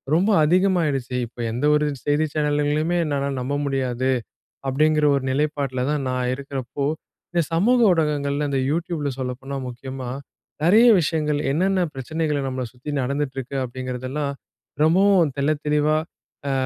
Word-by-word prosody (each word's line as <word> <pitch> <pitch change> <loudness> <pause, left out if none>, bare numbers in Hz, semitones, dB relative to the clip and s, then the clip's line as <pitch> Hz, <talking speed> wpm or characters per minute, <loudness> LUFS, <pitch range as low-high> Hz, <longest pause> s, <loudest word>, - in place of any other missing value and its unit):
ரொம்ப 190 +6 +3
அதிகமாயிடுச்சு. 160 -7 +2
"இப்போ 120 - -20
எந்த 125 +6 -1
ஒரு 150 0 +2 0.2
செய்தி 145 +2 +2
சேனல்களையுமே 150 +2 +1
என்னால 140 -1 -1
நம்ப 130 +3 -3
முடியாது." 130 -2 -1 0.6
அப்படிங்கிற 150 +2 +2
ஒரு 135 - -1
நிலைப்பாட்டில 140 -3 -1
தான் 145 -3 -1
நான் 125 -1 -1
இருக்கிறப்போ, 140 0 -4 0.5
இந்த 170 -1 +2
சமூக 235 +9 +3
ஊடகங்கள்ல 150 -3 0
இந்த 135 -1 0
YouTubeல 160 -2 -1
சொல்லப்போனா 130 +2 -4
முக்கியமா 130 +1 -6 0.5
நிறைய 215 +8 +6
விஷயங்கள் 150 -2 0
என்னன்ன 190 +5 +1
பிரச்சனைகள் 145 +1 -2
நம்மள 130 -1 -3
சுத்தி 125 +4 -9
நடந்துட்டு 140 +1 -2
இருக்கு. 135 +1 -5
அப்படிங்கிறதெல்லாம் 130 +3 -4 0.5
ரொம்பவும் 180 -1 +4
தெள்ளத்தெளிவா 150 +1 +1 0.5
அ - - +1
145 Hz, 125 wpm, -23 LUFS, 130-155 Hz, 0.6 s, நிறைய